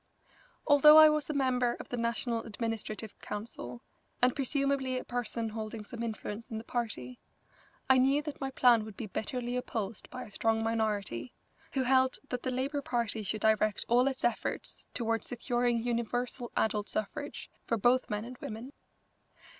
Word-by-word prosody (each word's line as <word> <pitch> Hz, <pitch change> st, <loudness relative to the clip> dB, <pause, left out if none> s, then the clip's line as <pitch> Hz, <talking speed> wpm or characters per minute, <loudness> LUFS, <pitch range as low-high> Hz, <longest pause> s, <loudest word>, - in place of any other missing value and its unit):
Although 300 Hz, +1 st, +8 dB
I 310 Hz, 0 st, +10 dB
was 305 Hz, -1 st, 0 dB
a -, -, 0 dB
member 250 Hz, -3 st, +2 dB
of -, -, -9 dB
the -, -, -2 dB
National 235 Hz, 0 st, -1 dB
Administrative 220 Hz, -1 st, -4 dB
Council 205 Hz, -, -6 dB, 0.4 s
and 250 Hz, 0 st, +4 dB
presumably 275 Hz, -1 st, 0 dB
a -, -, -3 dB
person 235 Hz, -2 st, -2 dB
holding 220 Hz, 0 st, -5 dB
some 235 Hz, +2 st, -8 dB
influence 225 Hz, -1 st, -5 dB
in 220 Hz, -, -4 dB
the 220 Hz, -, -5 dB
party, 205 Hz, -, -4 dB, 0.7 s
I 265 Hz, -1 st, +6 dB
knew 275 Hz, +3 st, +3 dB
that 300 Hz, -1 st, -6 dB
my 270 Hz, -, -1 dB
plan 245 Hz, -4 st, +5 dB
would 215 Hz, -2 st, -10 dB
be 230 Hz, -, -4 dB
bitterly 240 Hz, +4 st, -3 dB
opposed 225 Hz, -4 st, -4 dB
by 255 Hz, 0 st, -6 dB
a -, -, -12 dB
strong 225 Hz, +2 st, +1 dB
minority, 210 Hz, -, -1 dB, 0.4 s
who 265 Hz, -, +1 dB
held 260 Hz, 0 st, +3 dB
that 250 Hz, -1 st, -2 dB
the 255 Hz, -, -2 dB
Labour 270 Hz, +3 st, -1 dB
Party 235 Hz, -4 st, -1 dB
should 215 Hz, +1 st, -2 dB
direct 215 Hz, -1 st, +2 dB
all 245 Hz, +3 st, +4 dB
its 265 Hz, -1 st, -2 dB
efforts 240 Hz, -, -2 dB
toward 230 Hz, -1 st, 0 dB
securing 240 Hz, -1 st, 0 dB
universal 240 Hz, +1 st, -2 dB
adult 210 Hz, -1 st, +1 dB
suffrage 285 Hz, +8 st, -4 dB, 0.2 s
for 230 Hz, -, +1 dB
both 245 Hz, +4 st, +3 dB
men 210 Hz, +1 st, -2 dB
and 250 Hz, +1 st, -9 dB
women. 230 Hz, +6 st, -7 dB
235 Hz, 165 wpm, -31 LUFS, 220-255 Hz, 0.7 s, I